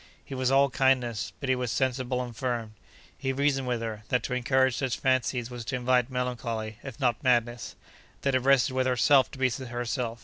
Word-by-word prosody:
He - - -8
was 130 -1 0
all 135 0 +4
kindness, 125 -5 +1
but 140 - -4
he 130 - +3
was 125 -2 -2
sensible 130 -1 0
and 120 -2 -8
firm. 120 -3 -3 0.4
He 135 - -2
reasoned 135 -1 0
with 120 -2 -1
her, 110 -2 -4
that 125 -2 +1
to 125 - -3
encourage 130 0 +2
such 130 -3 -1
fancies 125 -2 0
was 120 -1 -6
to 130 - -2
invite 125 0 +2
melancholy, 115 -4 -3
if 135 -3 -9
not 125 -4 0
madness. 120 -3 +1 0.5
That 140 - 0
it 130 - +4
rested 135 +1 +3
with 130 0 +1
herself 130 +2 +4
to - - -11
be 130 -1 +2
herself. 120 -1 -3
125 Hz, 200 wpm, -28 LUFS, 120-130 Hz, 0.5 s, all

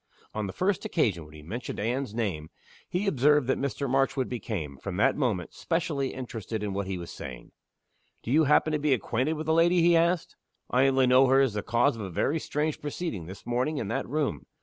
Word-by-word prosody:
On 110 -2 -2
the - - -4
first 185 - 0
occasion 100 - 0
when 75 0 -15
he 75 - -12
mentioned 115 +10 -5
Anne's 120 +1 -2
name 90 -10 -2 0.4
he 180 +4 -1
observed 150 -4 +3
that 130 - 0
Mr. 140 0 -2
Marchwood 135 0 +1
became, 100 - -4
from 90 +5 -5
that 105 - +3
moment, 110 - -1
specially 160 -5 -1
interested 115 -4 -5
in 100 -2 -2
what 100 0 -2
he 95 -1 -3
was 85 -1 -7
saying. 65 -2 -9 0.7
"Do 115 - -4
you 155 +3 +5
happen 150 +2 +3
to 150 - +1
be 145 -2 +3
acquainted 125 +6 -1
with 155 0 -5
the 160 - +2
lady?" 170 +1 +4
he 170 0 +5
asked 170 +1 +1 0.4
"I 130 +2 +4
only 135 -1 +3
know 130 +1 +6
her 135 +1 +5
as 135 -5 +3
the 105 - -2
cause 120 +6 +2
of - - -6
a 95 - -4
very 140 - 0
strange 150 0 -2
proceeding, 145 - -4
this 95 +2 -10
morning, 125 +6 0
in 110 -8 -3
that - - -2
room." 140 - -2
130 Hz, 215 wpm, -28 LUFS, 105-150 Hz, 0.7 s, know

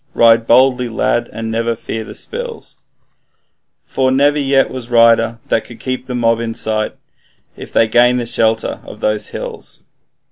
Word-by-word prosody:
Ride 115 0 +4
boldly, 125 0 +4
lad, 120 +1 -1
and 115 0 -5
never 115 +1 -1
fear 110 0 -5
the - - -11
spills, 470 -1 -7 1.0
For 130 -1 0
never 145 +3 +2
yet 135 -1 +2
was 130 -2 -7
rider 115 -1 +4
that 110 - +1
could 120 - -13
keep 130 0 -4
the 125 - -4
mob 115 -1 +1
in 115 -1 -4
sight, 110 -1 -2 0.6
If - - -10
once - - -23
they 115 - +4
gain 120 +2 +4
the 120 - -2
shelter 110 -1 0
of - - -11
those 105 0 -1
hills.' - - -7
115 Hz, 170 wpm, -16 LUFS, 115-130 Hz, 1.0 s, Ride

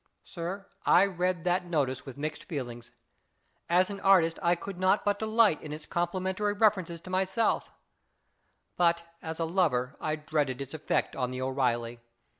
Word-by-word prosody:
Sir, 185 +3 -6 0.2
I 185 - +6
read 180 -2 -1
that 180 0 +1
notice 140 -6 -1
with 135 - -8
mixed 155 +2 -4
feelings. 120 -8 -6 0.8
As 185 +3 +3
an 200 - -6
artist 180 -5 +4
I 175 +1 +3
could 180 +1 -8
not 185 +2 +3
but 205 0 +1
delight 220 -5 +3
in 150 - -8
its 150 0 -7
complimentary 185 +4 -1
references 195 -6 +2
to 185 - -10
myself, 190 +4 +1 1.1
but 170 -1 +3 0.2
as 160 0 -6
a 165 - +1
lover 145 -8 +1
I 155 0 0
dreaded 150 -4 -1
its 140 +1 -6
effect 155 -1 -1
on 125 -2 -1
the 130 0 -4
O'Eeilly. 120 -3 -1
170 Hz, 160 wpm, -29 LUFS, 145-185 Hz, 1.1 s, I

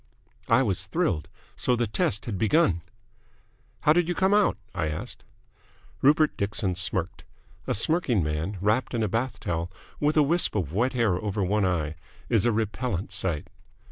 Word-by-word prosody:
I 115 +3 +5
was 100 -4 -1
thrilled. 150 - 0 0.3
So 125 - +1
the 120 0 0
test 105 -1 -1
had 100 -6 -4
begun! 110 - +3 1.0
"How 150 - +5
did 175 0 +2
you 175 - 0
come 190 +1 +2
out?" 210 -1 +3 0.2
I 90 -5 -1
asked. 75 0 -6 0.8
Rupert 150 +3 +4
Dixon 100 -1 -1
smirked. 90 0 -2 0.4
A - - +1
smirking 125 - +1
man, 75 +6 -2
wrapped 110 +5 +1
in 115 - 0
a - - +1
bath 115 +6 -2
towel, 85 +1 -3 0.3
with 150 +1 +1
a 150 - +6
wisp 170 0 +2
of 85 -7 -2
wet 120 +6 +1
hair 110 -6 +1
over 105 -1 -1
one 100 +2 +1
eye, 80 -4 -1 0.3
is - - +3
a 120 - +4
repellent 110 -3 -2
sight. 90 -5 -1
105 Hz, 170 wpm, -26 LUFS, 90-130 Hz, 1.0 s, a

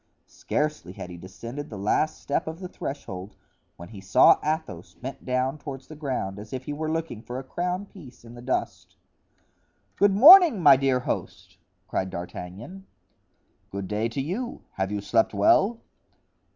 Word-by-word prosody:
Scarcely 150 - -3
had 90 - -8
he 85 - -9
descended 115 +10 -8
the 105 - -7
last 130 +10 0
step 140 - -2
of 160 +1 -6
the 185 - -6
threshold 100 - -7 0.4
when 85 - -11
he 105 -3 -10
saw 95 0 +5
Athos 155 - -4
bent 130 +2 -8
down 130 +3 -1
toward 135 -2 -7
the 155 - -13
ground, 130 -10 -3
as 105 +3 -10
if 130 0 -4
he 145 - -5
were 155 +1 -3
looking 160 -9 -3
for 120 +2 -7
a 135 - -5
crown 180 +7 -3
piece 145 -12 -15
in 115 - -12
the 120 - -11
dust. 130 +1 -3 1.0
"Good 200 -1 +4
morning, 320 - +9
my 145 -5 +8
dear 130 -1 +1
host," - - -5 0.3
cried 95 - -2
D'Artagnan. 95 - -8 0.8
"Good 100 -1 -5
day 105 +3 -1
to 125 +4 -3
you; 205 - -4
have 95 +1 -3
you 105 -1 -2
slept 110 +1 +1
well?" 195 - +4
130 Hz, 165 wpm, -26 LUFS, 100-160 Hz, 1.0 s, morning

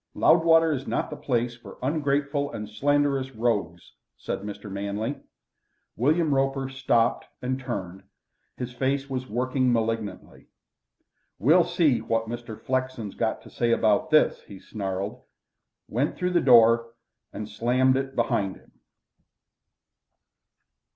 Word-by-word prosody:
Loudwater 165 -1 +5
is 135 -2 -3
not - - -2
the - - -4
place 120 -4 -1
for 120 - -13
ungrateful 145 0 0
and 105 -5 -6
slanderous 140 +3 0
rogues," 105 -8 -1 0.3
said - - -4
Mr. 105 +1 -8
Manley. 100 +2 -3 0.8
William 150 +5 +2
Roper 135 0 0
stopped 130 -3 +1
and 130 +1 -2
turned; 95 -8 -5 0.6
his 125 0 -5
face 135 +2 -1
was 130 -1 -4
working 130 +3 +1
malignantly. 115 -2 -3 0.9
"We'll 160 - +5
see 165 - +2
what 115 0 -1
Mr. 120 -1 -7
Flexen's 130 -5 -2
got - - -2
to - - -14
say 120 -1 0
about 110 +7 +2
this," 155 -1 +3
he 100 -2 -12
snarled, 100 +3 -5 0.7
went 130 +7 -1
through 180 0 -1
the 175 - +3
door, 115 -2 +5 0.4
and 105 0 -6
slammed 125 +5 +2
it 135 0 -3
behind 100 -5 0
him. - - -20
125 Hz, 125 wpm, -26 LUFS, 110-140 Hz, 0.9 s, Loudwater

